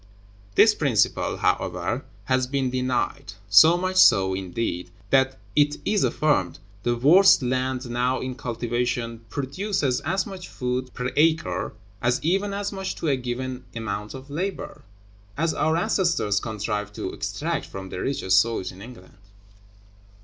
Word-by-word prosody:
This - - +7
principle, - - +1
however, - - -1 0.2
has 130 -1 +1
been 135 -1 -1
denied. 125 -5 -2 0.2
So 160 +12 +8
much 185 +1 -2
so, 95 - +6
indeed, 95 -1 -3 0.2
that 130 0 +3 0.2
(it 145 0 +3
is 210 -1 +2
affirmed) 120 - +1 0.2
the 120 +3 0
worst 175 +7 +6
land 130 0 -1
now 125 +2 0
in 130 0 -4
cultivation 120 -2 -3
produces 140 - -1
as 185 +6 -1
much 190 -2 -8
food 125 0 -3
per 125 +1 -3
acre, 145 - +1 0.3
and 120 +1 +1
even 195 +5 +1
as 200 0 -3
much 190 -1 -4
to 160 - -2
a 140 - +3
given 125 0 -4
amount 105 -1 -4
of 135 +2 -10
labor, 185 +6 -4 0.6
as 160 +1 +1
our 160 +2 +1
ancestors 170 - +1
contrived 105 -1 -4
to - - -4
extract - - -3
from 95 -1 -8
the 90 - -6
richest 95 -8 +2
soils 115 -2 -1
in 95 +1 -13
England. 110 -4 -13
130 Hz, 140 wpm, -24 LUFS, 115-155 Hz, 0.6 s, So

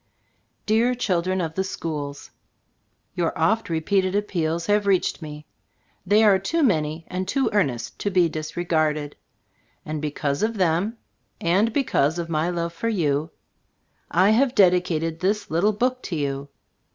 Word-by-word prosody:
Dear 230 +4 +2
Children 185 -5 0
of 160 -2 -3
tke 190 +2 -3
Sckoola: 145 -3 -5 0.8
Your 170 -2 -1
oft 210 +7 +1
repeated 185 +4 +1
appeals 170 -5 -1
have 205 0 +1
reached 190 -2 +1
me. 150 -1 -8 0.6
They 210 +3 +5
are 200 -3 +5
too 315 - 0
many 160 - +1
and 185 +1 -4
too 270 +6 +1
earnest 125 - -1
to 205 - -1
be 180 -3 +3
disregarded; 155 -2 -1 0.7
and 155 -1 -4
because 145 -1 -2
of 220 +1 0
them, 185 +5 +1 0.4
and 195 +7 +2
because 175 - +1
of 170 -1 -4
my 160 +1 0
love 170 -1 -2
for 230 +7 -2
you, 155 -6 0 0.8
I 185 +4 +4
have 255 +3 +2
dedicated 175 -4 +2
.this 200 +1 -1
little 175 +7 +3
book 250 +4 -1
to 175 - -4
you. 140 -1 -3
175 Hz, 145 wpm, -24 LUFS, 155-205 Hz, 0.8 s, They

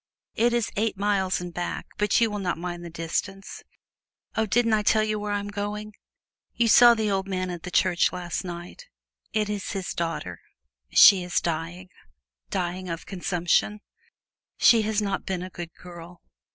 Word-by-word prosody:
It 240 +2 +2
is 235 -2 0
eight 215 -1 0
miles 195 -2 +1
and 175 -1 -7
back, 175 0 -4
but 210 -1 +3
you 230 -2 +2
will 205 - -3
not 180 -3 -2
mind 175 0 -5
the 170 - -7
distance. 170 +4 -4 0.7
Oh, 220 0 +1
didn't 230 +2 +2
I 215 - +3
tell 215 +1 +3
you 215 0 -1
where 210 0 -4
I'm 205 0 -2
going? 205 +1 -5 0.6
You 235 - +2
saw 240 +2 +8
the 215 -2 -1
old 195 0 -1
man 185 -1 -2
at 175 -2 -6
the 180 - -7
church 180 0 +2
last 175 -2 -4
night 175 - -8 0.4
it 215 -1 0
is 205 -2 -4
his 190 -3 -4
daughter 165 - -4 0.5
she 195 - +8
is 180 - 0
dying 170 +2 -4 0.6
dying 180 - -3
of 165 0 -5
consumption. 180 +2 0 0.8
She 230 -2 +6
has 215 0 0
not 195 -1 -3
been 185 -2 -2
a 185 - -8
good 175 -2 -7
girl. 175 -1 -12
190 Hz, 175 wpm, -25 LUFS, 175-210 Hz, 0.8 s, saw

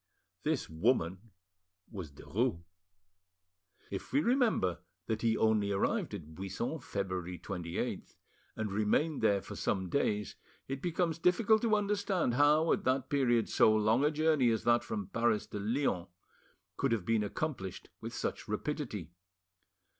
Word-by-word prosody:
This - - -1
woman 95 +3 0 0.6
was 95 -9 -6
Derues. 100 - -2 1.3
If - - -5
we 140 - +3
remember 230 - +2 0.3
that 110 -1 -2
he 115 -1 +2
only 110 -2 +2
arrived 100 - 0
at 80 +1 -9
Buisson 95 - -4
February 95 -6 -4
28th, 85 -1 -4 0.4
and 110 -2 -3
remained 110 +10 +1
there 100 -1 +3
for - - -8
some 95 -2 -1
days, 105 -5 0 0.3
it 135 0 -4
becomes 170 -1 0
difficult 210 +5 +4
to 225 -2 +3
understand 200 - 0
how 150 +5 +4
at - - -1
that 130 0 0
period 120 -5 +3
so 110 - +4
long 110 +5 +3
a 150 - +4
journey 155 -4 +3
as 110 -2 0
that 120 0 +3
from 105 -3 -3
Paris 115 0 +1
to 105 - -6
Lyons 105 -4 0 0.7
could 135 - +1
have 105 -6 -1
been 110 0 +2
accomplished 105 - -4
with - - -6
such - - -3
rapidity. 105 - -3
115 Hz, 140 wpm, -32 LUFS, 100-150 Hz, 1.3 s, difficult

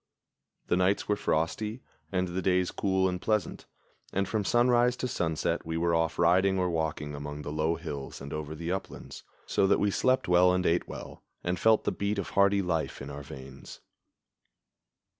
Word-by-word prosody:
The - - +1
nights 95 +2 +1
were 105 - +2
frosty, 105 +7 -1 0.3
and 90 -1 0
the 90 +2 -2
days 90 -1 +2
cool 95 -1 +1
and 90 -1 -3
pleasant, 105 -5 -1 0.4
and 100 0 0
from 110 0 -1
sunrise 120 +2 +3
to 125 - -3
sunset 80 -9 -1
we 80 0 -3
were 85 0 +1
off 80 0 +1
riding 95 +3 +4
or 90 -1 +1
walking 80 -2 -2
among 75 +1 -6
the 75 - -5
low 80 +2 0
hills 75 -5 -6
and 70 +1 -7
over 75 0 -5
the 85 +2 -4
uplands, 95 +1 -6 0.2
so 95 - +2
that 100 - +4
we 105 - +2
slept 130 +6 +2
well 90 +1 +5
and 90 0 0
ate 85 +1 +2
well, - - -9 0.2
and 90 +1 -1
felt 110 -1 +4
the - - 0
beat 100 +1 -2
of 100 - -3
hardy 100 0 +3
life 85 -3 -2
in 70 +1 -7
our 70 0 -7
veins. 70 0 -10
90 Hz, 185 wpm, -29 LUFS, 80-100 Hz, 0.4 s, well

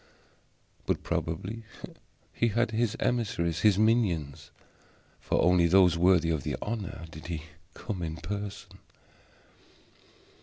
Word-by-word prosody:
But - - 0
probably 95 +8 -3 0.7
he 115 - +1
had 115 +1 +1
his 115 0 0
emissaries, 105 -9 0
his 105 -3 +4
minions: 100 - +1 0.7
for - - -1
only 90 0 +4
those 90 -1 +5
worthy 85 -1 +4
of 80 -3 -1
the - - -3
honor 105 -6 -5
did 80 +1 -10
he 80 -3 -4 0.3
come 100 -6 -5
in 80 -2 -3
person. 100 +5 -6
95 Hz, 115 wpm, -29 LUFS, 85-110 Hz, 0.7 s, those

